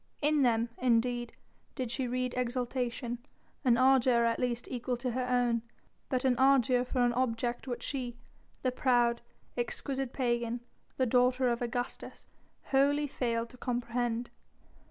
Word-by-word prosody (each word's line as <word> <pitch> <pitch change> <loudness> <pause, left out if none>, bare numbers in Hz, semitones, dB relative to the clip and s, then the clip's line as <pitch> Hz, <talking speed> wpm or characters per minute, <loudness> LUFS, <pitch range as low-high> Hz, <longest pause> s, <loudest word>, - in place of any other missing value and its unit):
In 300 0 +2
them, 235 -2 +2
indeed, 240 -1 +1 0.4
did 255 -4 -3
she 260 0 -1
read 250 0 -1
exultation, 245 -1 -2 0.4
an 245 -3 +4
ardour 255 -2 +4
at 230 0 +1
least 245 -1 -1
equal 250 0 -2
to 250 +1 -2
her 250 +1 -2
own, 245 -2 +2 0.5
but 255 0 0
an 255 -1 +4
ardour 260 -2 +4
for 250 0 +1
an 240 - +2
object 240 0 -1
which 245 -2 -4
she 250 -4 -4 0.5
the 255 - +2
proud, 240 -2 +2 0.3
exquisite 260 +2 -2
pagan, 240 -2 -1 0.4
the 260 - +3
daughter 250 +1 +3
of 235 - -2
Augustus 245 +1 -4 0.5
wholly 285 +2 +3
failed 235 -4 -2
to 250 - -14
comprehend. 240 -1 -2
245 Hz, 140 wpm, -31 LUFS, 240-255 Hz, 0.5 s, an